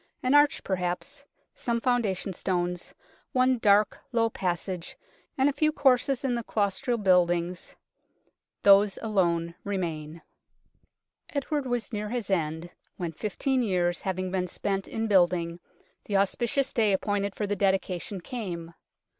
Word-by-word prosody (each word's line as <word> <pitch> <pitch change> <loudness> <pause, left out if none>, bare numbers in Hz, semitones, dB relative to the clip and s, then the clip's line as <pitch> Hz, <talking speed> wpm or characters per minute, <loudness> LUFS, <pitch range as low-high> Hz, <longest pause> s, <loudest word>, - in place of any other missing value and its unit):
An 255 +2 +2
arch 290 0 +4
perhaps, 190 +10 -3 0.3
some 235 -1 -1
founda 235 -6 +1
tion 195 - -4
stones, 180 -1 -2 0.4
one 255 -1 +3
dark, 210 -1 +4
low 230 -2 +2
passage 180 -1 -3 0.4
and 265 +1 +4
a 290 - +2
few 310 +2 +2
courses 270 -2 +2
in 255 - +1
the 235 -1 -2
claustral 215 +3 0
buildings 180 -3 +1 0.9
these 200 0 +6
alone 170 -6 +1
remain. 165 -5 -4 1.1
Edward 285 -1 -2
was 245 -1 -2
near 210 0 -3
his 235 -4 -3
end 165 -1 -1 0.3
when, 175 -2 -3
fifteen 250 +8 -1
years 180 -5 0
having 185 -1 -2
been 185 -1 -1
spent 195 +2 -2
in 225 - -2
building, 175 -4 +2 0.5
the 200 - +1
auspicious 240 +7 0
day 215 -4 +3
appointed 200 0 -1
for 210 - -2
the 205 0 -1
dedication 190 -1 -1
came. 175 -7 -6
200 Hz, 135 wpm, -27 LUFS, 180-235 Hz, 1.1 s, these